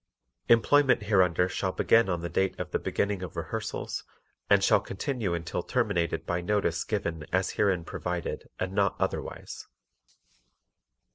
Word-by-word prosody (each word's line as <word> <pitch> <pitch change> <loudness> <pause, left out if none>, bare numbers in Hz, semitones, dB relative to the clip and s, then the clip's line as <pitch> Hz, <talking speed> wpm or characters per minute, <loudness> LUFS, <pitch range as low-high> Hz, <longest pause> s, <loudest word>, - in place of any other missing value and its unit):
Employment 125 +1 +5
hereunder 90 -4 +3
shall 95 0 -2
begin 115 -3 +4
on 90 -2 -1
the 85 - -3
date 95 +1 0
of - - -4
the - - 0
beginning 100 -2 -1
of 90 -3 -7
rehearsals 85 +7 -4 0.5
and - - +5
shall - - +5
continue 100 -3 -2
until 85 0 -3
terminated 95 -8 0
by 90 0 -1
notice 90 -3 0
given 85 -7 -2
as 95 +1 +1
herein 95 -5 +1
provided 90 0 -4
and 95 +1 -2
not 100 -1 +2
otherwise. - - -4
95 Hz, 140 wpm, -28 LUFS, 85-105 Hz, 0.5 s, Employment